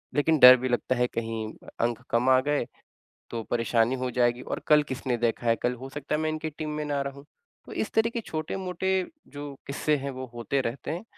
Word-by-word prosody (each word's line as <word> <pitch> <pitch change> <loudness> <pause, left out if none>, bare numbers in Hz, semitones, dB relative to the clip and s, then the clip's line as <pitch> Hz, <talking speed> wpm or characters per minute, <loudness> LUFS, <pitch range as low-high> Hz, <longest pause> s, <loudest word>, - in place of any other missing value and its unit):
लेकिन 155 +2 +3
डर 125 0 +11
भी 130 +1 -2
लगता 125 +1 0
है 125 0 +2
कहीं, 115 -1 -3 0.3
अंक 120 0 0
कम 120 +2 +2
आ 130 0 +6
गए, 145 -2 0 0.7
तो 115 -1 -3
परेशानी 115 0 +2
हो 125 - 0
जाएगी 120 0 +2
और - - -4
कल 150 -1 +6
किसने 130 -2 -2
देखा 120 0 0
है? 115 0 +4
कल 125 - 0
हो 130 +2 -8
सकता 145 +2 -4
है 150 - +1
मैं 155 - +1
इनकी 155 0 -3
टीम 155 0 -5
में 150 - -2
ना 145 -1 -1
रहूँ। 140 +1 -7 0.4
तो - - -10
इस - - -2
तरह 225 +1 +3
के 235 - -1
छोटे-मोटे 185 +1 -3 0.4
जो 145 -1 -7
किस्से 150 +2 +1
हैं, 140 0 -4
वो 130 0 -6
होते 135 +4 -1
रहते 120 +3 -4
हैं 175 +7 -4
130 Hz, 220 wpm, -27 LUFS, 120-150 Hz, 0.7 s, डर